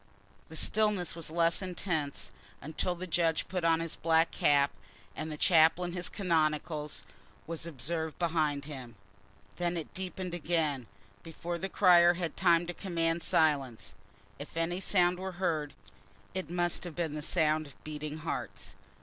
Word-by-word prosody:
The 160 Hz, -, -9 dB
stillness 205 Hz, -2 st, +2 dB
was 165 Hz, -2 st, -3 dB
less 165 Hz, +2 st, +2 dB
intense 175 Hz, -6 st, -3 dB, 0.3 s
until 160 Hz, +4 st, -2 dB
the 180 Hz, +1 st, -6 dB
judge 165 Hz, -2 st, +1 dB
put 180 Hz, -2 st, -3 dB
on 165 Hz, -1 st, +4 dB
his 165 Hz, -1 st, -3 dB
black 165 Hz, 0 st, +3 dB
cap, 140 Hz, -1 st, +3 dB, 0.4 s
and 155 Hz, 0 st, -4 dB
the 150 Hz, -, -5 dB
chaplain 170 Hz, +1 st, +4 dB
in -, -, -6 dB
his 180 Hz, 0 st, -1 dB
canonicals 155 Hz, -4 st, 0 dB, 0.4 s
was 165 Hz, 0 st, -3 dB
observed 160 Hz, +2 st, -3 dB
behind 155 Hz, -4 st, 0 dB
him. 130 Hz, -6 st, -8 dB, 0.6 s
Then 175 Hz, 0 st, 0 dB
it 160 Hz, -, -6 dB
deepened 185 Hz, -1 st, -4 dB
again, 155 Hz, -7 st, 0 dB, 0.3 s
before 170 Hz, +1 st, -5 dB
the 190 Hz, -, -3 dB
crier 175 Hz, -2 st, +6 dB
had 170 Hz, -3 st, -2 dB
had -, -, -29 dB
time 170 Hz, -1 st, +4 dB
to 175 Hz, -, -4 dB
command 170 Hz, -3 st, -1 dB
silence. 145 Hz, -8 st, +1 dB, 0.5 s
If -, -, -8 dB
any 170 Hz, +2 st, 0 dB
sound 180 Hz, -2 st, +2 dB
were 190 Hz, 0 st, -4 dB
heard, 160 Hz, -5 st, -1 dB, 0.6 s
it 185 Hz, -2 st, -3 dB
must 175 Hz, 0 st, 0 dB
have 175 Hz, -4 st, -7 dB
been 165 Hz, -4 st, -2 dB
the 150 Hz, -, -4 dB
sound 155 Hz, -1 st, +2 dB
of 140 Hz, -, -17 dB
beating 155 Hz, 0 st, -5 dB
hearts. -, -, -4 dB
165 Hz, 160 wpm, -31 LUFS, 155-175 Hz, 0.6 s, crier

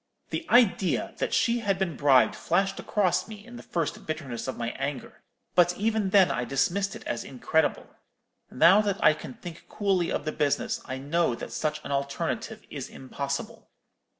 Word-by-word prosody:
The 330 Hz, -, -3 dB
idea 225 Hz, -6 st, +3 dB
that -, -, -1 dB
she 235 Hz, 0 st, +2 dB
had 200 Hz, -4 st, 0 dB
been 185 Hz, -5 st, -1 dB
bribed 135 Hz, -3 st, +4 dB
flashed 195 Hz, +3 st, 0 dB
across 195 Hz, -4 st, +1 dB
me 215 Hz, -1 st, -10 dB
in 240 Hz, +1 st, -11 dB
the -, -, -8 dB
first 165 Hz, -3 st, -3 dB
bitterness 135 Hz, -7 st, -4 dB
of 130 Hz, -, -4 dB
my 115 Hz, 0 st, -2 dB
anger: 135 Hz, 0 st, -5 dB, 0.3 s
but 175 Hz, 0 st, +4 dB
even 215 Hz, -1 st, 0 dB
then 190 Hz, -2 st, +5 dB
I 125 Hz, -, -1 dB
dismissed 175 Hz, +10 st, 0 dB
it -, -, -10 dB
as 120 Hz, -, -3 dB
incredible. 145 Hz, +4 st, 0 dB, 0.6 s
Now 170 Hz, +9 st, +6 dB
that 200 Hz, -2 st, -1 dB
I -, -, +7 dB
can 135 Hz, -4 st, -9 dB
think 170 Hz, -2 st, -10 dB
coolly 195 Hz, -4 st, 0 dB
of -, -, -2 dB
the 155 Hz, -, -1 dB
business, 145 Hz, -2 st, 0 dB
I 130 Hz, -1 st, -4 dB
know 145 Hz, 0 st, 0 dB
that -, -, -8 dB
such 155 Hz, -1 st, -1 dB
an -, -, -5 dB
alternative 140 Hz, 0 st, -3 dB
is -, -, -6 dB
impossible. 140 Hz, +1 st, -5 dB
170 Hz, 175 wpm, -27 LUFS, 140-195 Hz, 0.6 s, I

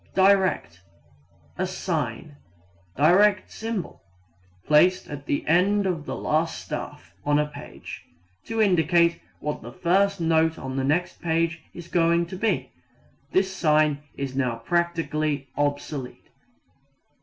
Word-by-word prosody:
Direct 190 Hz, -, +3 dB, 0.8 s
a -, -, +1 dB
sign 70 Hz, -, -3 dB, 0.6 s
([direct 185 Hz, +7 st, +4 dB
symbol]) 225 Hz, -4 st, -5 dB, 0.6 s
placed 180 Hz, +5 st, +4 dB
at 145 Hz, 0 st, -8 dB
the 140 Hz, -, -1 dB
end 195 Hz, +5 st, +3 dB
of 165 Hz, -5 st, -2 dB
the -, -, -3 dB
last 160 Hz, +2 st, 0 dB
staff 85 Hz, -, -7 dB
on 145 Hz, 0 st, +2 dB
a 150 Hz, -, +2 dB
page, 150 Hz, 0 st, -10 dB, 0.4 s
to 225 Hz, 0 st, -3 dB
indicate 170 Hz, -4 st, +3 dB, 0.2 s
what 150 Hz, 0 st, -3 dB
the 120 Hz, -, -9 dB
first 195 Hz, +6 st, +1 dB
note 160 Hz, -1 st, +2 dB
on 130 Hz, 0 st, -6 dB
the 135 Hz, -, 0 dB
next 170 Hz, +6 st, 0 dB
page 165 Hz, -1 st, 0 dB
is 175 Hz, -1 st, -9 dB
going 170 Hz, 0 st, +2 dB
to 185 Hz, -, -8 dB
be. 220 Hz, +4 st, -1 dB, 0.6 s
This 190 Hz, 0 st, +1 dB
sign 155 Hz, -4 st, +2 dB, 0.2 s
is 135 Hz, -2 st, -4 dB
now 130 Hz, -3 st, 0 dB
practically 155 Hz, 0 st, -1 dB
obsolete. 145 Hz, -2 st, -3 dB
165 Hz, 125 wpm, -25 LUFS, 145-180 Hz, 0.8 s, direct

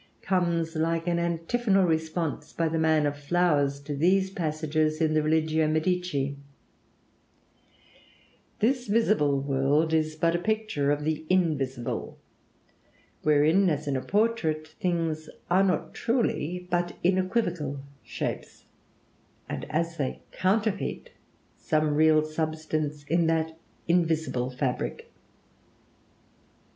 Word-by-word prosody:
comes 170 Hz, -3 st, 0 dB
like 165 Hz, +1 st, 0 dB
an 170 Hz, -1 st, +1 dB
antiphonal 190 Hz, +5 st, +1 dB
response 160 Hz, -2 st, -2 dB
by 165 Hz, -, 0 dB
"the 160 Hz, 0 st, -1 dB
man 160 Hz, -1 st, +3 dB
of 145 Hz, 0 st, 0 dB
flowers" 145 Hz, -2 st, +1 dB
to 145 Hz, +1 st, -5 dB
these 190 Hz, +5 st, +2 dB
passages 155 Hz, -2 st, -1 dB
in 160 Hz, -1 st, +2 dB
the 155 Hz, -, +3 dB
'Religio 155 Hz, 0 st, +2 dB
Medici': 155 Hz, -3 st, 0 dB, 2.2 s
"This 245 Hz, +2 st, +1 dB
visible 205 Hz, -10 st, +2 dB
world 140 Hz, +3 st, +1 dB
is 155 Hz, -1 st, +1 dB
but 165 Hz, +2 st, +1 dB
a -, -, +1 dB
picture 215 Hz, -8 st, -1 dB
of 145 Hz, 0 st, 0 dB
the 155 Hz, 0 st, -1 dB
invisible, 140 Hz, -9 st, -1 dB, 1.0 s
wherein, 155 Hz, +6 st, +4 dB
as 150 Hz, -1 st, -2 dB
in 140 Hz, -, 0 dB
a 130 Hz, -, -1 dB
portrait, 175 Hz, -, 0 dB
things 165 Hz, -5 st, -1 dB, 0.2 s
are 185 Hz, +2 st, +5 dB
not 185 Hz, -2 st, 0 dB
truly, 180 Hz, -, -1 dB
but 175 Hz, 0 st, -1 dB
in 185 Hz, +2 st, +3 dB
equivocal 175 Hz, -8 st, -1 dB, 0.2 s
shapes, -, -, -5 dB, 0.8 s
and -, -, -5 dB
as 165 Hz, +2 st, -1 dB
they 135 Hz, -3 st, -3 dB
counterfeit 205 Hz, +1 st, -1 dB, 0.5 s
some 155 Hz, -1 st, +1 dB
real 155 Hz, 0 st, +4 dB
substance 155 Hz, -1 st, -3 dB
in 165 Hz, +3 st, +1 dB
that 160 Hz, 0 st, 0 dB, 0.3 s
invisible 160 Hz, -7 st, +1 dB
fabric." 125 Hz, 0 st, -3 dB
160 Hz, 115 wpm, -27 LUFS, 150-180 Hz, 2.2 s, are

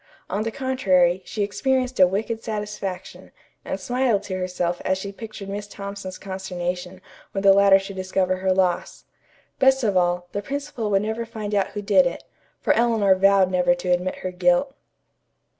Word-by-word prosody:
On 205 Hz, -, -1 dB
the 225 Hz, -, -1 dB
contrary, 195 Hz, -9 st, +2 dB
she 210 Hz, -, -2 dB
experienced 255 Hz, +4 st, -1 dB
a 185 Hz, -, +8 dB
wicked 220 Hz, +4 st, -3 dB
satisfaction, 210 Hz, -4 st, -5 dB, 0.3 s
and -, -, -4 dB
smiled 245 Hz, -5 st, 0 dB
to 185 Hz, -, -4 dB
herself 180 Hz, -1 st, -2 dB
as 190 Hz, 0 st, +1 dB
she 195 Hz, +1 st, -6 dB
pictured 215 Hz, -1 st, -9 dB
Miss 205 Hz, +1 st, -5 dB
Thompson's 200 Hz, -2 st, -7 dB
consternation 185 Hz, -1 st, -5 dB, 0.3 s
when 195 Hz, -, -2 dB
the 195 Hz, -1 st, +7 dB
latter 200 Hz, 0 st, +6 dB
should 195 Hz, 0 st, -7 dB
discover 185 Hz, 0 st, 0 dB
her 190 Hz, 0 st, 0 dB
loss. 185 Hz, -2 st, 0 dB, 0.5 s
Best 265 Hz, -1 st, +4 dB
of 205 Hz, -4 st, +1 dB
all, 175 Hz, 0 st, +1 dB
the 205 Hz, -, -3 dB
principal 275 Hz, -2 st, -4 dB
would 195 Hz, 0 st, +2 dB
never 220 Hz, +2 st, -2 dB
find 215 Hz, -2 st, -6 dB
out 200 Hz, -2 st, +2 dB
who 205 Hz, 0 st, -4 dB
did 195 Hz, -3 st, +4 dB
it, 170 Hz, -, -5 dB, 0.4 s
for -, -, +2 dB
Eleanor 225 Hz, -4 st, +3 dB
vowed 195 Hz, 0 st, +4 dB
never 180 Hz, -1 st, +3 dB
to 175 Hz, +1 st, -5 dB
admit 180 Hz, +1 st, 0 dB
her 185 Hz, -, -1 dB
guilt. 265 Hz, +9 st, +2 dB
195 Hz, 175 wpm, -23 LUFS, 185-220 Hz, 0.5 s, a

